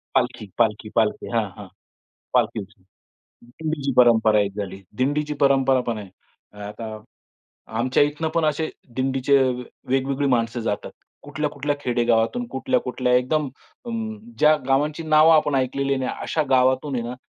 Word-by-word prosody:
पालखी 105 - 0
पालखी 110 -2 +1
पालखी. 110 -2 +1
हां, 115 -2 +2
हां. - - -9 0.7
पालखी. - - +2 0.8
दिंडीची 140 +2 -3
परंपरा 110 -3 +5
एक 100 -1 -1
झाली. 95 -1 -5 0.2
दिंडीची 150 +3 0
परंपरा 135 -2 +4
पण 115 -2 -1
आहे. 100 -3 -9 0.4
अ, 105 - -16
आता 110 0 -7 0.8
आमच्या 130 +4 +2
इथनं 150 +2 0
पण 165 -1 +2
असे 155 +1 0 0.3
दिंडीचे 135 +1 +2 0.5
वेगवेगळी 135 +2 0
माणसं 120 -1 0
जातात. 105 -2 -3 0.3
कुठल्या, 145 +1 -3
कुठल्या 145 0 -2
खेडेगावातून. 120 - +1
कुठल्या, 130 - 0
कुठल्या 125 0 0
एकदम 140 +4 +1 0.4
अ, 235 - -4 0.5
ज्या 155 0 +5
गावांची 145 +4 +1
नावं 155 +1 +6
आपण 150 -2 +3
ऐकलेली 135 +1 0
नाही, 130 -1 -2
अशा 155 - 0
गावांतून 130 +2 +3
आहे 120 - -2
ना, 125 - -5
130 Hz, 140 wpm, -23 LUFS, 115-145 Hz, 0.8 s, नावं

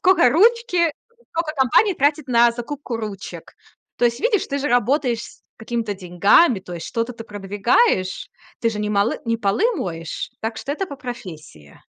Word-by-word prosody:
скока 365 -9 +5
ручки, 360 - +3 0.4
скока 330 -2 -2
компания 280 - +3
тратит 290 0 +1
на 235 -1 +5
закупку 245 0 -5
ручек. 210 -3 -7 0.4
То - - +1
есть, 235 -1 +1
видишь, 430 -4 +1
ты 280 0 -2
же 290 - -1
работаешь 245 -1 +1
с - - -13
какими-то 225 -2 -3
деньгами, 190 - +3
то 180 -2 -9
есть 170 - -6
что-то 230 +2 -2
ты 225 -1 -10
продвигаешь, 205 - +1 0.3
ты 230 - +2
же 210 - -5
не 210 0 -2
молы 200 +2 +1
не 230 0 0
полы 215 - +1
моешь. 165 - -5
Так 225 0 -3
что 280 - -4
это 380 +6 -3
по 280 - -8
профессии. 170 - -10
235 Hz, 170 wpm, -21 LUFS, 205-290 Hz, 0.4 s, скока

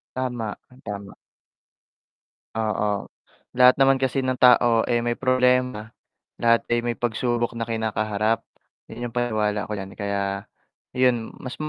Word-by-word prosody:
Tama, 120 -4 -3 0.3
tama. 100 -1 -7 1.4
Oo, 105 -2 -1 0.5
lahat 125 0 +6
naman 135 -1 +4
kasi 130 0 0
ng 130 -1 -1
tao 120 -2 +6
ay 120 -1 +1
may 120 - +1
problema, 125 -3 +1 0.5
lahat 115 0 +3
ay 120 - +3
may 120 -1 -2
pagsubok 120 0 -1
na 115 0 -4
kinakaharap, 110 -1 0 0.5
yun 120 +2 -7
yung - - -13
paniwala 110 -4 -1
ako 105 - -3
diyan 95 0 -7
kaya, 100 0 -3 0.4
yun 125 -3 +1
mas 130 - -7
115 Hz, 130 wpm, -24 LUFS, 105-125 Hz, 1.4 s, lahat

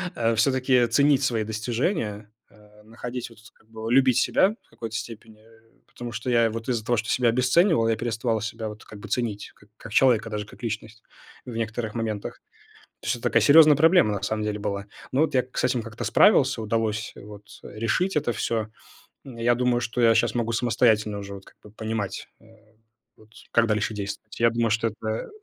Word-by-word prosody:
э, 115 -1 +1
всё-таки 130 +1 +3
ценить 140 +3 +3
свои 115 -4 0
достижения, 110 - -3 0.2
э, 105 0 -21
находить 120 +3 -7
вот 115 -2 -18
тут 110 - -17
как 110 - -29
бы 110 0 -6
любить 130 -1 +4
себя 200 +3 +2
в - - -35
какой-то 115 -2 -7
степени, 110 -1 -8
э, 115 0 -24
потому 120 -1 -8
что 115 +2 -5
я 115 -2 +3
вот 115 +2 -6
из-за 115 -3 -1
того, 120 - +1
что 110 +1 -3
себя 125 -2 +2
обесценивал, 130 - +3
я 115 - +2
переставал 115 -1 -1
себя 110 0 -5
вот 105 0 -11
как 105 - -12
бы 105 - -9
ценить 110 -4 -3
как 105 - -23
как 115 - -11
человека, 115 -4 +3
даже 105 -1 -4
как 110 - -16
личность 110 0 -5 0.4
в 120 - -8
некоторых 115 0 -3
моментах. 110 -3 -4 0.6
То - - -8
есть - - +1
это - - -16
такая - - +3
серьезная 150 0 +7
проблема 160 - +4
на 100 - -4
самом 110 +1 -2
деле 105 0 -3
была. 100 0 -3 0.3
Ну, 135 - +1
вот 160 - +1
я 130 - +5
к 130 - -14
с - - 0
этим 125 -1 +1
как-то 110 -1 -7
справился, - - +4
удалось 110 -1 -2
вот 105 0 -12 0.2
решить 120 - -1
это 140 -5 +1
всё. 110 -2 -2 0.6
М, 130 -4 -10
я 120 +1 +2
думаю, 125 0 +1
что 120 +1 -2
я 115 -1 +5
щас 120 0 +1
могу 115 -1 -1
самостоятельно 110 -3 +1
уже 100 0 -8
вот 95 - -12
как - - -19
бы 105 - -14
понимать, 110 -2 -4
э-э, 110 0 -23 0.4
вот 110 0 -21 0.2
как 120 -1 +3
дальше 105 0 0
действовать. 105 +1 -7
Я 115 0 +5
думаю, 115 -1 0
что 115 +1 +1
это 110 0 -4
115 Hz, 205 wpm, -25 LUFS, 110-120 Hz, 0.6 s, серьезная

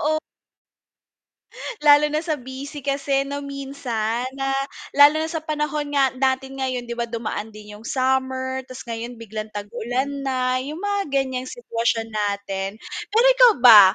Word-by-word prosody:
Oo. 310 - 0 1.6
Lalo 295 0 +6
na 305 - +1
sa 315 -2 -1
busy 275 +2 -8
kasi 275 0 +1
'no 285 +1 -4
minsan 260 -4 -3
na, 270 0 -1 0.4
lalo 290 +2 +7
na 320 - -4
sa 320 - -2
panahon 300 -1 -2
nga 270 -2 +3
natin 265 +1 -1
ngayon 255 -2 -2
'di 235 0 -5
ba 235 0 -1
dumaan 225 -2 -4
din 210 0 -11
'yung 215 - -15
summer, 260 0 0
ta's 255 - -9
ngayon 235 +1 -5
biglang 220 -1 -6
tag-ulan 240 +6 -2 0.2
na, 255 -1 0
'yung 295 +5 -6
mga 405 0 0
ganiyang 260 -2 -1
sitwasyon 230 - -1
natin. 200 -2 -2 0.4
Pero 455 +4 +4
ikaw - - +7
ba, 220 -4 +12
260 Hz, 150 wpm, -23 LUFS, 235-285 Hz, 1.6 s, ba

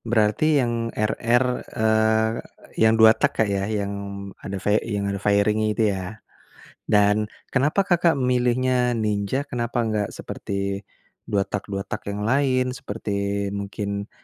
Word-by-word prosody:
Berarti 110 +3 +1 0.2
yang 115 -1 -1
RR, 115 +3 +2 0.3
eee, 110 0 +3 0.5
yang 110 0 +5
2 110 0 +8
tak, - - +1
Kak, 110 - +3
ya? 100 0 -1
Yang 100 -2 -2 0.5
ada 100 - -5
fai 105 +1 +3
yang 105 -3 -3
ada 100 - -4
fairing-nya 105 +1 +2
itu, 115 - +2
ya? 95 +3 -6 0.6
Dan, 105 +1 +2 0.2
kenapa 150 +9 +2
Kakak 170 -4 +3
memilihnya 125 -1 +1
Ninja? 105 +5 -1
Kenapa 120 -2 -3
enggak 105 -2 -1
seperti 100 0 -4 0.5
2 100 - +1
tak-2 100 -1 -4
tak - - -5
yang 105 +1 -3
lain, 130 0 +2
seperti 100 -3 -3
mungkin 100 0 -4
110 Hz, 135 wpm, -23 LUFS, 100-120 Hz, 0.6 s, 2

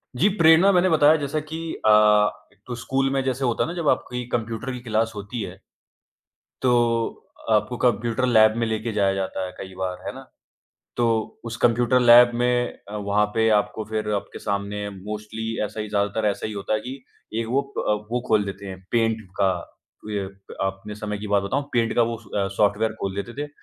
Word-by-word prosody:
जी, 165 +11 +3
प्रेरणा 165 +4 +6
मैंने 185 0 +3
बताया 155 -1 +5
जैसा 145 +1 -2
कि 160 - -4 0.3
अ, 110 - +5 0.6
एक 105 - -31
तो 125 - -4
स्कूल 135 +3 0
में 135 -1 +1
जैसे 130 0 -2
होता 120 -2 +1
है - - -2
ना, - - -4
जब 170 -3 -2
आपकी 125 -1 -1
कंप्यूटर 115 +2 -2
की 125 - -5
क्लास 115 -1 0
होती 105 +3 -5
है 95 -3 -7 1.0
तो, 120 -2 +1 0.3
आपको 110 +3 +2
कंप्यूटर 120 +1 +1
लैब 110 -3 +5
में 115 - +1
लेके 110 +1 -2
जाया 100 -2 +2
जाता 95 -1 -3
है 90 - -6
कई 95 -1 -8
बार, 95 -1 -3
है - - -2
ना? - - -10 0.7
तो 115 -2 0
उस 115 0 -5
कंप्यूटर 120 +2 +3
लैब 120 0 +8
में 120 0 +1 0.2
अ, 105 - -6
वहाँ 105 0 +1
पे 110 0 +3
आपको 105 +1 -3
फिर 110 -1 -2
आपके 100 - -4
सामने 105 0 -3
मोस्टली 105 +3 -6 0.2
ऐसा 110 +1 -5
ही 105 - -4
ज़्यादातर 105 +1 0
ऐसा 100 - -2
ही 110 - -5
होता 100 +1 -2
है 110 - 0
कि, 130 +3 -8 0.3
एक 115 0 -1
वो 135 +4 +2
अ, 140 -5 -2 0.2
वो 125 +1 0
खोल 110 -2 +3
देते 100 0 -7
हैं 95 -1 -8
पेंट 115 -1 +2 0.2
का, 95 - +4 0.6
ये 100 -2 -2 0.4
अपने 95 +2 -5
समय 105 0 -4
की 105 - -6
बात 100 -1 +2
बताऊँ 100 +9 -1
पेंट 115 -2 +1
का 120 - +5
वो 115 - -3
स 100 -1 -3
सॉफ्टवेयर 105 +2 +2
खोल 95 -1 -2
देते 120 - -11
थे 150 - -5
110 Hz, 200 wpm, -24 LUFS, 105-125 Hz, 1.0 s, लैब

